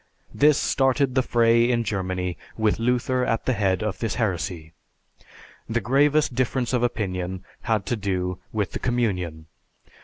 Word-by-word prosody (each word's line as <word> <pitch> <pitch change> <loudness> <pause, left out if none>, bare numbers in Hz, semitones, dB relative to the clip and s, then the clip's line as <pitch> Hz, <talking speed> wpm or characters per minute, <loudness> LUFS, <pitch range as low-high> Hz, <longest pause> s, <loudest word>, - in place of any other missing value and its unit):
This 150 0 +4
started 135 0 +2
the 130 - +3
fray 115 -1 +3
in 120 -1 +1
Germany 95 -4 -2 0.2
with 110 -1 +1
Luther 125 +2 +1
at 115 -2 -1
the 130 - +2
head 95 -3 0
of 105 -2 -3
this 115 -3 -2
heresy. 90 -7 -2 1.0
The 115 +1 +1
gravest 145 +4 +2
difference 130 0 0
of 125 - +2
opinion 95 -6 -2 0.2
had 110 -3 0
to 120 - 0
do 90 -3 -2
with 105 -3 -1
the - - -4
Communion. 90 -10 -1
115 Hz, 150 wpm, -24 LUFS, 95-125 Hz, 1.0 s, This